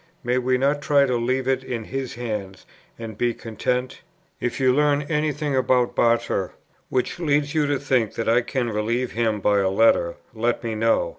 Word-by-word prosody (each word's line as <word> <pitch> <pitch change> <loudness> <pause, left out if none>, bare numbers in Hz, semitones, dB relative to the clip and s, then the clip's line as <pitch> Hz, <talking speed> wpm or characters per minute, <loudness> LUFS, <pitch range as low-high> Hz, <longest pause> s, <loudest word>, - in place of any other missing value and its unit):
May 125 +1 +1
we 130 0 +1
not 140 +3 +1
try 145 -2 +4
to 125 -2 0
leave 130 +2 -1
it 130 0 +1
in 120 -3 -4
His 135 +2 -5
hands, 105 -5 -5 0.3
and 115 -2 -7
be 120 +2 0
content? 125 +3 -3 0.4
"If 120 - -3
you 130 -1 +4
learn 145 +1 +2
any 150 +1 0
thing 145 -1 -2
about 125 -1 +2
Barter, 115 -5 +1 0.4
which 130 +6 -1
leads 145 -3 +1
you 155 -2 +2
to 145 -1 +1
think 130 -5 0
that 115 - -3
I 115 +2 +4
can 120 -1 -2
relieve 115 +4 -1
him 110 -2 0
by 100 +1 +3
a 95 -1 +2
letter, 95 -4 +3 0.2
let 120 +1 -1
me 115 -1 -2
know. 115 +1 +1
125 Hz, 195 wpm, -23 LUFS, 115-135 Hz, 0.4 s, try